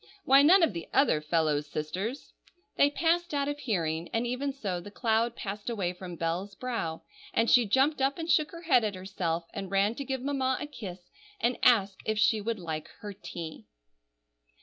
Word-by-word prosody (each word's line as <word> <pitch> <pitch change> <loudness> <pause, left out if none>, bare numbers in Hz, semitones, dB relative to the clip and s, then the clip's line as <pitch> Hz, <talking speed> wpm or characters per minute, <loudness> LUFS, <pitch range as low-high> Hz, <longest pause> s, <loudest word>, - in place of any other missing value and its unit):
Why, 270 +1 +7
none 345 +5 +7
of 325 - +3
the 170 -1 -6
other 265 - +3
fellows' 150 -2 +1
sisters—" 185 - -4 0.4
They 285 - +5
passed 335 +2 +1
out 280 0 0
of 290 0 -3
hearing; 170 - -1
and 230 +1 0
even 255 +4 -2
so 200 -10 -3
the 205 - -9
cloud 230 +2 0
passed 205 +3 -5
away 195 -6 -1
from 180 -1 -8
Bell's 175 +5 -3
brow, 210 -10 -3 0.3
and 230 - +3
she 240 -2 +5
jumped 270 +7 +2
up 270 +1 +1
and 325 -1 -4
shook 310 -2 +3
her 335 0 -10
head 260 -8 +4
at 210 -2 -1
herself, 180 -3 -3
and 195 - -5
ran 200 +3 +2
to 280 - -5
give 265 -2 -3
Mamma 265 -2 0
a - - -4
kiss, 195 -11 -9 0.3
and 240 +2 0
ask 200 -5 +4
if 215 0 -1
she 220 0 +3
would 225 +2 -2
like 160 -3 -5
her 205 -2 -6
tea. 170 - -8
215 Hz, 195 wpm, -29 LUFS, 175-265 Hz, 0.4 s, Why